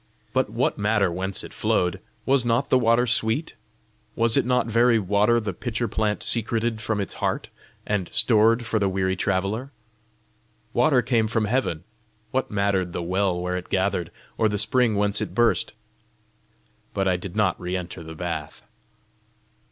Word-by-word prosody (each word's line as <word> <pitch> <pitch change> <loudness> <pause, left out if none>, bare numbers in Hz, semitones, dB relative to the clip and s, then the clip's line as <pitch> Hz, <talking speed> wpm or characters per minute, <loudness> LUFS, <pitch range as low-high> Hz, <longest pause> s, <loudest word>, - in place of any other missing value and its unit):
But - - +1
what - - -1
matter 105 -3 +2
whence 95 +2 -2
it - - -10
flowed? 90 -1 0 0.3
was 135 -2 +3
not 120 +3 0
the 130 - +5
water 115 +1 +3
sweet? 115 +6 0 0.6
Was 115 0 +3
it - - +2
not 125 0 +2
very 115 +1 +3
water 105 +3 +2
the 105 -4 -4
pitcher 120 +4 -3
plant 105 0 -1
secreted 115 -1 -1
from 110 -1 -1
its 100 - -3
heart, - - -1 0.4
and 100 -4 -1
stored 115 +1 +3
for 115 -2 0
the 100 -1 +1
weary 95 0 0
traveller? 100 +7 -1 1.0
Water 125 0 +3
came 115 -2 +2
from 110 0 0
heaven: 105 -8 -1 0.5
what 130 - -1
mattered 100 -3 0
the 85 - -3
well 90 0 0
where 90 +1 -2
it 90 - -8
gathered, 95 -3 0 0.3
or 110 - +3
the 105 - -1
spring 115 +2 +2
whence 100 0 0
it - - -4
burst? 120 -1 +2 1.2
But 95 -1 +1
I 90 - +3
did 90 +1 -6
not 105 -5 +1
re 90 +1 -2
enter 90 -1 -7
the 80 0 -9
bath. 80 -3 -5
105 Hz, 165 wpm, -24 LUFS, 95-115 Hz, 1.2 s, the